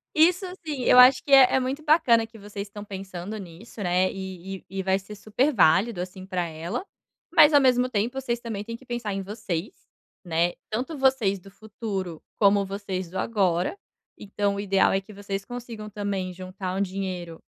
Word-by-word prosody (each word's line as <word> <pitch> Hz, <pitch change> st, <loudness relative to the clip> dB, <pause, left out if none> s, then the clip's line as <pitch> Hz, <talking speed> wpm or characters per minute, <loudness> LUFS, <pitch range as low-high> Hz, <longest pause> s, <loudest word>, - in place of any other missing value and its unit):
Isso 355 Hz, +4 st, +4 dB, 0.2 s
sim, 290 Hz, -5 st, -4 dB
eu 250 Hz, -, +6 dB
acho 255 Hz, +1 st, +8 dB
que 280 Hz, -, -7 dB
é 265 Hz, -2 st, +8 dB
é -, -, +4 dB
muito 265 Hz, +4 st, -3 dB
bacana 240 Hz, -8 st, +4 dB
que 225 Hz, 0 st, -15 dB
vocês 205 Hz, 0 st, -7 dB
estão 205 Hz, 0 st, -9 dB
pensando 190 Hz, 0 st, -7 dB
nisso, 195 Hz, +4 st, -10 dB
né, 185 Hz, 0 st, +2 dB
e 190 Hz, 0 st, -7 dB
e -, -, -20 dB
e 195 Hz, +1 st, -4 dB
vai 190 Hz, +1 st, +2 dB
ser 210 Hz, +2 st, -10 dB
super 225 Hz, +8 st, 0 dB
válido, 190 Hz, -, +3 dB
assim, 185 Hz, +1 st, -6 dB
pra 185 Hz, -2 st, -2 dB
ela, 170 Hz, -, -5 dB, 0.5 s
mas 300 Hz, +1 st, +8 dB
ao 290 Hz, -, +7 dB
mesmo 255 Hz, -1 st, +3 dB
tempo 240 Hz, +5 st, -1 dB
vocês 240 Hz, -2 st, -2 dB
também 220 Hz, -4 st, -5 dB
têm 230 Hz, +1 st, -6 dB
que 260 Hz, -, -19 dB
pensar 240 Hz, -4 st, -3 dB
em 195 Hz, 0 st, -3 dB
vocês, 205 Hz, -, -4 dB, 0.5 s
né, 170 Hz, 0 st, +1 dB, 0.2 s
tanto 255 Hz, +9 st, -3 dB
vocês 245 Hz, -8 st, +2 dB
do 195 Hz, -, -15 dB
futuro, 200 Hz, -5 st, -6 dB, 0.2 s
como 200 Hz, -1 st, +5 dB
vocês 195 Hz, -2 st, -4 dB
do 190 Hz, -, -6 dB
agora. 185 Hz, -, +1 dB, 0.4 s
Então, 200 Hz, 0 st, -2 dB
o -, -, -4 dB
ideal 195 Hz, -1 st, +3 dB
é 195 Hz, -, +1 dB
que 210 Hz, -, -15 dB
vocês 200 Hz, -1 st, -5 dB
consigam 230 Hz, -2 st, -8 dB
também 200 Hz, -3 st, -3 dB
juntar 185 Hz, +1 st, -6 dB
um -, -, 0 dB
dinheiro 185 Hz, -3 st, -4 dB
200 Hz, 190 wpm, -25 LUFS, 185-235 Hz, 0.5 s, acho